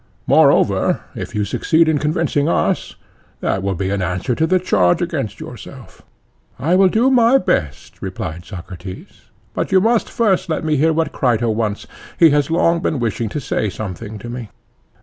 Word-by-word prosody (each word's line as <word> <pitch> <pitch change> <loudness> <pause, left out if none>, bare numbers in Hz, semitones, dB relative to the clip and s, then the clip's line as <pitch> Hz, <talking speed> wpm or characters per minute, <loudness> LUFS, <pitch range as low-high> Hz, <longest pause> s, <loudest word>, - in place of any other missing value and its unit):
Moreover, - - +3
if - - -7
you 105 -1 0
succeed 160 +9 +2
in 155 -2 +2
convincing 150 0 0
us, - - 0 0.4
that 95 - -1
will 100 0 -1
be 95 +2 -2
an 100 -1 -1
answer 90 +8 -1
to 160 +7 0
the 185 +2 +3
charge 95 - +2
against - - -3
yourself. - - -11 0.6
I 165 +6 0
will 190 +1 +5
do 230 +8 +2
my 245 0 +5
best, 75 - -2
replied 90 -4 -5
Socrates. 90 0 -10 0.2
But - - -3
you 190 - +5
must 225 +3 +1
first 195 -5 +1
let 160 - -1
me 155 -1 +1
hear 155 +3 +3
what 160 0 0
Crito 120 -3 +1
wants; 110 -2 -2 0.3
he 165 -3 +6
has 145 0 +1
long 170 0 +2
been 160 - -1
wishing 115 -2 -2
to 150 - -4
say 110 -5 -2
something 105 +2 -6
to 105 - -9
me. 120 -2 -6
130 Hz, 175 wpm, -19 LUFS, 100-165 Hz, 0.6 s, he